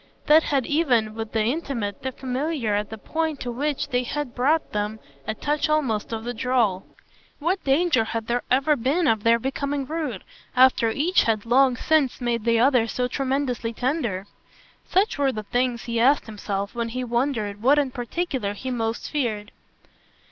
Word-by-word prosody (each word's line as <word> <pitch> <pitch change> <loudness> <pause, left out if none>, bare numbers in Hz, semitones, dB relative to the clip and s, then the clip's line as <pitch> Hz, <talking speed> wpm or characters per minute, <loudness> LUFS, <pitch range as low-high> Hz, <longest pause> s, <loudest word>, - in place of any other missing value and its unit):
That 310 +1 +7
had 275 -5 0
even, 250 -9 +2
with 225 0 -5
the 220 -1 +1
intimate, 235 - -2
the 260 - -3
familiar 260 -2 -2
at 205 0 -1
the 220 - -7
point 315 +5 -2
to 245 - -3
which 285 +4 -2
they 250 -2 +1
had 270 0 -4
brought 295 +6 +1
them, 210 +1 -2 0.3
a 220 - -2
touch 300 +5 -1
almost 260 -10 0
of 225 -1 -3
the 240 +1 -3
droll. 230 -6 0 0.5
What 355 +6 -1
danger 275 -4 +3
had 225 0 -3
there 240 +2 0
ever 275 +4 +3
been 285 +8 +1
of 220 -4 +2
their 230 +2 +4
becoming 275 +3 -2
rude 300 - -4 0.3
after 255 -3 +5
each 310 +11 +2
had 220 -2 0
long 255 +2 +4
since 300 -4 +1
made 235 -3 -1
the 230 -1 +3
other 250 -2 +4
so 250 +2 -1
tremendously 260 -3 -1
tender? 240 - -1 0.6
Such 380 -4 +2
were 275 -2 +3
the 215 -3 -5
things 245 +2 -1
he 235 -1 -2
asked 270 +5 +4
himself 200 -2 -4
when 235 -1 -2
he 255 +2 -3
wondered 235 -4 -1
what 275 +5 +5
in 280 -3 +1
particular 245 - -3
he 260 +5 -5
most 225 -2 -3
feared. 220 -8 -2
250 Hz, 175 wpm, -24 LUFS, 225-285 Hz, 0.6 s, That